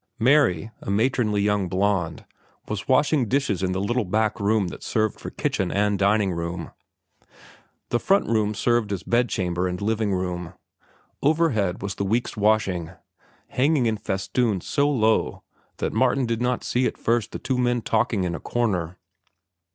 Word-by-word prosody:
Mary, 115 Hz, -, +3 dB
a -, -, -7 dB
matronly 105 Hz, -1 st, +1 dB
young 100 Hz, -3 st, +1 dB
blonde, 95 Hz, -4 st, 0 dB, 0.4 s
was 105 Hz, -1 st, -4 dB
washing 135 Hz, -1 st, +3 dB
dishes 130 Hz, -7 st, 0 dB
in 95 Hz, -1 st, 0 dB
the 95 Hz, -, -1 dB
little 120 Hz, +5 st, 0 dB
back 110 Hz, +3 st, 0 dB
room 100 Hz, -2 st, +1 dB
that -, -, -9 dB
served 110 Hz, -1 st, -1 dB
for -, -, -6 dB
kitchen 95 Hz, -, -2 dB
and 105 Hz, 0 st, +1 dB
dining 100 Hz, 0 st, +3 dB
room. 85 Hz, -1 st, -4 dB, 1.2 s
The 120 Hz, -, +1 dB
front 195 Hz, +8 st, +2 dB
room 110 Hz, -2 st, +1 dB
served 120 Hz, -1 st, +1 dB
as 100 Hz, -, -3 dB
bedchamber 95 Hz, -7 st, 0 dB
and 90 Hz, 0 st, -3 dB
living 110 Hz, 0 st, 0 dB
room. 90 Hz, -2 st, -3 dB, 0.7 s
Overhead 135 Hz, -, +1 dB
was 100 Hz, -1 st, -2 dB
the 100 Hz, -, -3 dB
week's 115 Hz, +5 st, -1 dB
washing, 100 Hz, -6 st, +1 dB, 0.6 s
hanging 140 Hz, 0 st, +2 dB
in 110 Hz, -1 st, +1 dB
festoons 100 Hz, +1 st, -1 dB
so 145 Hz, 0 st, +1 dB
low 110 Hz, -6 st, +1 dB, 0.3 s
that -, -, -2 dB
Martin 135 Hz, -2 st, +2 dB
did 115 Hz, 0 st, -2 dB
not 125 Hz, 0 st, 0 dB
see 125 Hz, +1 st, +1 dB
at -, -, -5 dB
first 115 Hz, -2 st, 0 dB
the -, -, -4 dB
two 130 Hz, -2 st, -2 dB
men 120 Hz, -2 st, +1 dB
talking 110 Hz, -3 st, +1 dB
in 90 Hz, -1 st, -1 dB
a 80 Hz, -, -4 dB
corner. 95 Hz, -8 st, -1 dB
105 Hz, 160 wpm, -24 LUFS, 95-120 Hz, 1.2 s, Mary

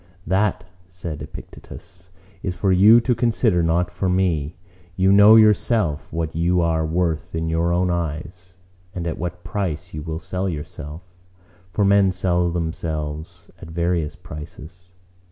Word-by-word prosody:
"That," 95 Hz, +4 st, +1 dB, 0.3 s
said 85 Hz, -4 st, -6 dB
Epictetus, 90 Hz, 0 st, -12 dB, 0.3 s
"is 90 Hz, -2 st, -3 dB
for 95 Hz, 0 st, +1 dB
you 105 Hz, +6 st, +7 dB
to 125 Hz, +1 st, +1 dB
consider, 115 Hz, -5 st, +1 dB
not 85 Hz, +2 st, +1 dB
for 95 Hz, -, -2 dB
me. 85 Hz, -5 st, 0 dB, 0.4 s
You 95 Hz, 0 st, +3 dB
know 105 Hz, +2 st, +8 dB
yourself 105 Hz, -6 st, +3 dB
what 80 Hz, -1 st, -3 dB
you 85 Hz, +2 st, +2 dB
are 80 Hz, -2 st, +1 dB
worth 80 Hz, -1 st, -1 dB
in 80 Hz, 0 st, -2 dB
your 85 Hz, +1 st, +1 dB
own 90 Hz, +1 st, +1 dB
eyes; 85 Hz, +2 st, -5 dB, 0.4 s
and 85 Hz, -2 st, -4 dB
at 85 Hz, -, -3 dB
what 90 Hz, +1 st, -5 dB
price 90 Hz, -4 st, -3 dB
you 75 Hz, -, -5 dB
will 80 Hz, +1 st, -4 dB
sell 90 Hz, +4 st, -3 dB
yourself. 80 Hz, 0 st, -7 dB, 0.7 s
For 100 Hz, +4 st, +1 dB
men 100 Hz, -1 st, +4 dB
sell 90 Hz, -1 st, +1 dB
themselves 80 Hz, -2 st, -4 dB
at -, -, -9 dB
various 85 Hz, -2 st, -1 dB
prices. 85 Hz, +2 st, -11 dB
85 Hz, 145 wpm, -22 LUFS, 80-95 Hz, 0.7 s, know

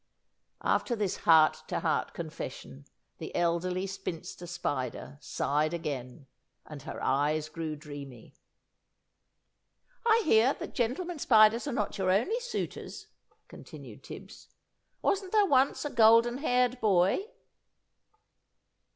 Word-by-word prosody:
After 240 Hz, -, +1 dB
this 205 Hz, -4 st, -2 dB
heart 160 Hz, -1 st, +6 dB
to -, -, -2 dB
heart -, -, -1 dB
confession, 70 Hz, 0 st, -7 dB, 0.3 s
the -, -, -7 dB
Elderly 175 Hz, +2 st, 0 dB
Spinster 180 Hz, -2 st, -6 dB
Spider 145 Hz, -5 st, -4 dB
sighed 155 Hz, +3 st, -1 dB
again, 140 Hz, -4 st, -6 dB, 0.4 s
and 150 Hz, -2 st, -10 dB
her -, -, -7 dB
eyes 150 Hz, +3 st, +1 dB
grew 155 Hz, -1 st, -5 dB
dreamy. 145 Hz, -5 st, -10 dB, 1.7 s
"I 460 Hz, -1 st, +4 dB
hear 240 Hz, 0 st, +4 dB
that -, -, -8 dB
gentlemen 295 Hz, +8 st, -2 dB
spiders 225 Hz, 0 st, +5 dB
are -, -, -1 dB
not 210 Hz, -4 st, -2 dB
your 185 Hz, -1 st, +1 dB
only 235 Hz, -, +2 dB
suitors," 485 Hz, 0 st, -6 dB, 0.4 s
continued -, -, -12 dB
Tibbs; -, -, -11 dB, 0.6 s
"wasn't 385 Hz, -1 st, 0 dB
there 420 Hz, -2 st, +5 dB
once 275 Hz, -3 st, +2 dB
a 295 Hz, -, -3 dB
golden 230 Hz, +2 st, +5 dB
haired 250 Hz, -3 st, +1 dB
boy?" 195 Hz, -, +2 dB
190 Hz, 115 wpm, -29 LUFS, 155-250 Hz, 1.7 s, heart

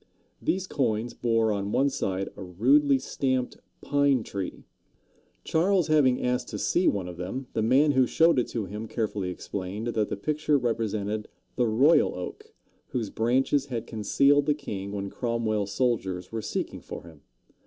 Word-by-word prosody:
These 185 Hz, +1 st, 0 dB
coins 120 Hz, -, -1 dB
bore 115 Hz, -2 st, +1 dB
on 100 Hz, 0 st, -2 dB
one 140 Hz, +4 st, +2 dB
side 95 Hz, -5 st, -2 dB
a -, -, -10 dB
rudely 135 Hz, +10 st, +3 dB
stamped 130 Hz, -1 st, -1 dB, 0.2 s
pine 140 Hz, -4 st, +2 dB
tree. 95 Hz, -3 st, -5 dB, 0.8 s
Charles 175 Hz, +1 st, +2 dB
having 140 Hz, -5 st, +3 dB
asked 125 Hz, 0 st, 0 dB
to -, -, -5 dB
see 180 Hz, -, +1 dB
one 95 Hz, -3 st, +1 dB
of 90 Hz, -1 st, -8 dB
them, 95 Hz, +10 st, -4 dB
the 110 Hz, -, 0 dB
man 135 Hz, +7 st, +4 dB
who 130 Hz, -2 st, +3 dB
showed 165 Hz, -1 st, +4 dB
it 125 Hz, -, 0 dB
to 115 Hz, -4 st, -3 dB
him 105 Hz, +4 st, -6 dB
carefully 105 Hz, -4 st, -2 dB
explained 100 Hz, +4 st, -5 dB
that 110 Hz, -3 st, 0 dB
the -, -, -3 dB
picture 150 Hz, +5 st, +1 dB
represented 110 Hz, -3 st, -2 dB, 0.3 s
the 125 Hz, -, +2 dB
Royal 130 Hz, +9 st, +4 dB
Oak, 90 Hz, -, -7 dB, 0.4 s
whose 115 Hz, -5 st, -3 dB
branches 130 Hz, +4 st, +1 dB
had 120 Hz, -4 st, -4 dB
concealed 140 Hz, +7 st, +2 dB
the 150 Hz, -, +3 dB
king 100 Hz, -9 st, -6 dB
when 100 Hz, -1 st, -4 dB
Cromwell's 110 Hz, -4 st, -1 dB
soldiers 95 Hz, -8 st, -1 dB
were 115 Hz, 0 st, -3 dB
seeking -, -, -4 dB
for -, -, -8 dB
him. 80 Hz, -3 st, -15 dB
115 Hz, 165 wpm, -27 LUFS, 100-135 Hz, 0.8 s, man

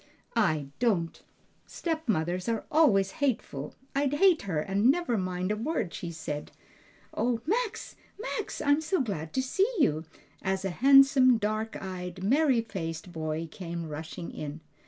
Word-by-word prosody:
"I 155 Hz, -11 st, +1 dB
don't! 195 Hz, -9 st, 0 dB, 0.5 s
stepmothers 205 Hz, -, -1 dB
are 225 Hz, -2 st, -1 dB
always 205 Hz, -12 st, +4 dB
hateful! 215 Hz, -, -1 dB, 0.2 s
I'd 280 Hz, 0 st, +1 dB
hate 360 Hz, +2 st, +5 dB
her 160 Hz, -4 st, +1 dB
and 195 Hz, +8 st, +2 dB
never 305 Hz, -4 st, +2 dB
mind 185 Hz, -1 st, -1 dB
a -, -, +1 dB
word 225 Hz, -, -2 dB
she 175 Hz, -, -5 dB
said. 155 Hz, -2 st, -5 dB, 0.6 s
O 240 Hz, -1 st, 0 dB
Max, 440 Hz, +5 st, -1 dB, 0.2 s
Max! 440 Hz, -2 st, -4 dB
I'm 285 Hz, +2 st, +3 dB
so 350 Hz, +4 st, 0 dB
glad 165 Hz, -, -3 dB
to 260 Hz, -, +1 dB
see 390 Hz, -, +1 dB
you!" 160 Hz, -, +2 dB, 0.4 s
as 190 Hz, 0 st, -1 dB
a 190 Hz, -, -1 dB
handsome, 270 Hz, -, +6 dB
dark 215 Hz, +1 st, -2 dB
eyed, 185 Hz, -1 st, -6 dB
merry 265 Hz, +2 st, +3 dB
faced 175 Hz, -5 st, -5 dB
boy 160 Hz, 0 st, -3 dB
came 170 Hz, -3 st, -5 dB
rushing 160 Hz, +3 st, -6 dB
in. 150 Hz, +1 st, -6 dB
210 Hz, 145 wpm, -29 LUFS, 170-275 Hz, 0.6 s, handsome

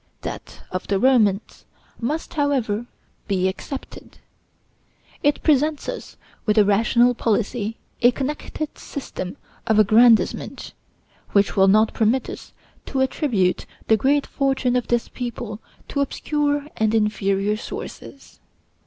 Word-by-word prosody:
That -, -, -8 dB
of 185 Hz, -, -4 dB
the 200 Hz, -, +1 dB
Romans 220 Hz, -4 st, +2 dB, 0.4 s
must, 300 Hz, +10 st, -3 dB
however, 255 Hz, -7 st, 0 dB, 0.4 s
be 190 Hz, -3 st, +1 dB
excepted. 265 Hz, +8 st, -7 dB, 1.0 s
It 290 Hz, 0 st, +1 dB
presents 300 Hz, 0 st, +2 dB
us -, -, -6 dB, 0.3 s
with 210 Hz, +1 st, +2 dB
a 210 Hz, -, +6 dB
rational 235 Hz, +4 st, +4 dB
policy, 225 Hz, -1 st, -1 dB, 0.2 s
a 240 Hz, -, +7 dB
connected 295 Hz, +3 st, -4 dB
system 185 Hz, -9 st, -6 dB, 0.3 s
of 220 Hz, -2 st, +3 dB
aggrandizement, 220 Hz, +2 st, +3 dB, 0.6 s
which 200 Hz, -3 st, +3 dB
will 195 Hz, 0 st, +5 dB
not 215 Hz, +3 st, +4 dB
permit 235 Hz, +4 st, +1 dB
us -, -, -10 dB, 0.4 s
to 270 Hz, -, -2 dB
attribute 245 Hz, -, 0 dB, 0.2 s
the 220 Hz, -, +7 dB
great 280 Hz, +5 st, +2 dB
fortune 265 Hz, -3 st, 0 dB
of 250 Hz, -, 0 dB
this 240 Hz, -1 st, +1 dB
people 235 Hz, -3 st, -6 dB, 0.3 s
to 280 Hz, -, -1 dB
obscure 290 Hz, +1 st, -1 dB
and 220 Hz, 0 st, +2 dB
inferior 210 Hz, -1 st, +1 dB
sources. 270 Hz, +4 st, -9 dB
235 Hz, 120 wpm, -22 LUFS, 210-275 Hz, 1.0 s, a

